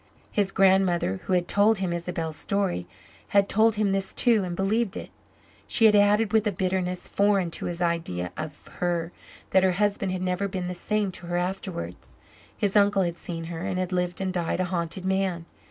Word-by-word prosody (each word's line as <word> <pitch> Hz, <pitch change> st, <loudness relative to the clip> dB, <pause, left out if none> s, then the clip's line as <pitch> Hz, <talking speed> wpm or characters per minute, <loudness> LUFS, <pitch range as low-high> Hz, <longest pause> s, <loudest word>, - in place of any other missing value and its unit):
His 200 Hz, -2 st, +1 dB
grandmother, 185 Hz, -, +3 dB
who 190 Hz, -, -1 dB
had 175 Hz, -1 st, +2 dB
told 210 Hz, +2 st, +4 dB
him 185 Hz, -3 st, -1 dB
Isabel's 170 Hz, -2 st, -3 dB
story, 195 Hz, -, -1 dB, 0.4 s
had 200 Hz, -1 st, +3 dB
told 220 Hz, +2 st, +3 dB
him 210 Hz, -1 st, +1 dB
this 195 Hz, 0 st, -2 dB
too, 230 Hz, -5 st, +3 dB
and 175 Hz, -1 st, -4 dB
believed 200 Hz, +3 st, 0 dB
it. -, -, -8 dB, 0.6 s
She 225 Hz, -, +3 dB
had 215 Hz, -, +7 dB
added, 205 Hz, +1 st, +4 dB
with 220 Hz, -1 st, +3 dB
a -, -, +2 dB
bitterness 185 Hz, -1 st, -2 dB
foreign 200 Hz, -4 st, +2 dB
to -, -, -3 dB
his 175 Hz, 0 st, -2 dB
idea 125 Hz, -, -1 dB
of 155 Hz, -2 st, -7 dB
her, 175 Hz, -1 st, -1 dB, 0.4 s
that 190 Hz, -, +5 dB
her 185 Hz, -1 st, +3 dB
husband 200 Hz, 0 st, 0 dB
had 185 Hz, 0 st, -3 dB
never 185 Hz, +2 st, 0 dB
been 185 Hz, -2 st, -4 dB
the 180 Hz, -, -3 dB
same 205 Hz, +2 st, -1 dB
to 175 Hz, -1 st, -7 dB
her 175 Hz, 0 st, -1 dB
afterwards; 180 Hz, -, -4 dB, 0.4 s
his 200 Hz, -1 st, -1 dB
uncle 200 Hz, -1 st, +4 dB
had 170 Hz, -1 st, -3 dB
seen 165 Hz, -2 st, -5 dB
her 165 Hz, 0 st, -6 dB
and 185 Hz, 0 st, -2 dB
had 185 Hz, 0 st, -2 dB
lived 180 Hz, -1 st, -1 dB
and 190 Hz, -1 st, -2 dB
died 175 Hz, -1 st, -1 dB
a 185 Hz, -, +1 dB
haunted 180 Hz, +1 st, -3 dB
man. 190 Hz, -3 st, 0 dB
185 Hz, 200 wpm, -26 LUFS, 175-200 Hz, 0.6 s, had